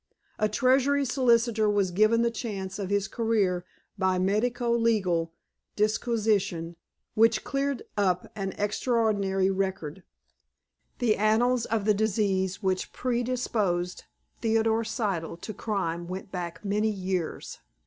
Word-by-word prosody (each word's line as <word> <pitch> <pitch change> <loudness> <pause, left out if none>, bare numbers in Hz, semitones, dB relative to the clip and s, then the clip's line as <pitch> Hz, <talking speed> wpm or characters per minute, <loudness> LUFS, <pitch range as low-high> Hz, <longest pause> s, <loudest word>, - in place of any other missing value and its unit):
A 215 - +2
Treasury 270 +5 +3
solicitor 235 -4 +2
was 200 -3 +1
given 215 +5 +3
the 235 - +2
chance 200 -4 -5
of 195 -2 -3
his 200 0 +1
career 210 -7 0 0.4
by 190 -1 +2
the 180 - +1
medico 235 +5 +1
legal 195 -8 +1 0.4
disquisition 210 -6 0 0.4
which 225 +1 +3
cleared 275 -1 -2
up 185 -3 +1
an 195 -2 -3
extraordinary 205 -3 +1
record. 190 -4 -3 1.0
The 230 -4 +2
annals 230 +3 +2
of 220 -3 -1
the 210 - +4
disease 200 -2 0
which 185 -1 -1
predisposed 235 -8 -1 0.3
Theodore 225 0 +2
Siddle 195 -7 -3
to 215 - -6
crime 175 -5 -2
went 190 +2 -6
back 175 0 -5
many 210 +2 +1
years. 185 -4 -3
210 Hz, 120 wpm, -27 LUFS, 190-230 Hz, 1.0 s, the